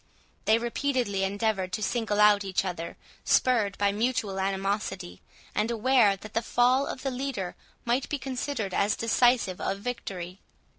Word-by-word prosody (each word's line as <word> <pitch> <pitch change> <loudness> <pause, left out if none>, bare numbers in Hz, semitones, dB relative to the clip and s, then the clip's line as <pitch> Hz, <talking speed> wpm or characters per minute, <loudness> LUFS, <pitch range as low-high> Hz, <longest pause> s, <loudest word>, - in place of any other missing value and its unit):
They 220 - +5
repeatedly 235 -4 -1
endeavoured 195 -1 -1
to 215 - -2
single 220 -1 0
out 210 -1 +6
each 190 0 -1
other, 170 -2 -5 0.3
spurred 225 -6 +2
by 200 0 +2
mutual 215 -2 -1
animosity, 195 -1 -2 0.3
and 215 +2 0
aware 235 -2 +4
that 215 +3 -11
the 230 - +1
fall 250 +4 +2
of 255 - -5
either 270 - 0
leader 245 -9 -3 0.3
might 245 +3 0
be 295 - -1
considered 255 -5 -3
as 205 +2 +2
decisive 230 -4 +2
of 195 - -1
victory. 195 -5 -5
215 Hz, 150 wpm, -27 LUFS, 195-245 Hz, 0.3 s, out